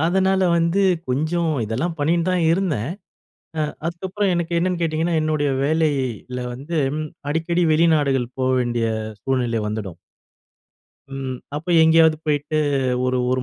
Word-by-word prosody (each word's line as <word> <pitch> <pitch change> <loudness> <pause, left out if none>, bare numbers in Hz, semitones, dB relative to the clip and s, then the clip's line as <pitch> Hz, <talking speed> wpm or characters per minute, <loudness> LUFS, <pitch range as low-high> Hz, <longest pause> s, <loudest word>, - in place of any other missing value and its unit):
அதனால 190 +2 +2 0.2
வந்து, 170 +4 +2 0.3
கொஞ்சம் 160 +6 0
இதெல்லாம் 140 +11 -2
பண்ணின்னு 170 +4 +1
தான் 180 -2 +1
இருந்தேன். 165 - -1 0.7
அ - - +2 0.3
அதுக்கப்புறம் 190 +3 -2
எனக்கு 170 0 -1
என்னான்னு 180 -1 -1
கேட்டீங்கன்னா, 165 +1 0
என்னுடைய 155 -2 0
வேலையில 140 -6 -1
வந்தும் 145 +1 -2 0.3
அடிக்கடி 170 +2 0
வெளிநாடுகள் 145 -6 +2
போ 130 - +1
வேண்டிய 120 -2 0 0.3
சூழ்நிலை 120 -3 0
வந்துடும். 100 -5 -5 1.2
ம். 135 -1 -4 0.2
அப்ப 160 +4 -7
எங்கேயாவது 160 0 +5
போயிட்டு 150 +1 0 0.5
ஒரு, 130 0 +1
1 130 0 0
155 Hz, 120 wpm, -21 LUFS, 130-170 Hz, 1.2 s, எங்கேயாவது